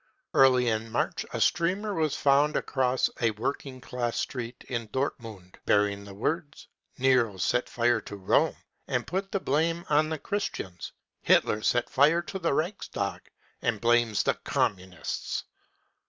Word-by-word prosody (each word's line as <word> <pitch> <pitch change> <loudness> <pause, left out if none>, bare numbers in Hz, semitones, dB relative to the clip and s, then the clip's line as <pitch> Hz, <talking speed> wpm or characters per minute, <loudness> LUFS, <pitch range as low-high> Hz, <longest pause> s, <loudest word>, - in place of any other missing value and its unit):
Early 130 -2 +5
in 110 0 -1
March 120 - -1
a - - -3
streamer 190 +5 +1
was 155 -5 0
found 145 +2 +3
across 130 -1 +1
a 115 - +4
working 130 +4 -4
class 120 -2 -3
street 120 -1 -4
in 115 -3 -3
Dortmund, 110 -7 -4
bearing 100 -1 +2
th£ 100 -1 -10
words: 145 - -3 0.3
cc - - -16
Nero 125 -6 +3
set 125 +6 0
fire 120 -1 +2
to 105 - -8
Rome 95 -2 +2 0.3
and - - -1
put 195 +2 -3
the 195 - 0
blame 165 +3 0
on 155 +1 +4
the 160 - -2
Christians 115 - -4 0.2
— - - -58
Hitler 105 - +3
set 120 +2 +1
fire 150 +5 +3
to 190 - -6
the 170 - 0
Reichstag 155 - -3 0.3
and 115 -3 0
blames 120 -1 +3
the - - +2
Communists 95 -1 -2
125 Hz, 155 wpm, -28 LUFS, 110-155 Hz, 0.3 s, Early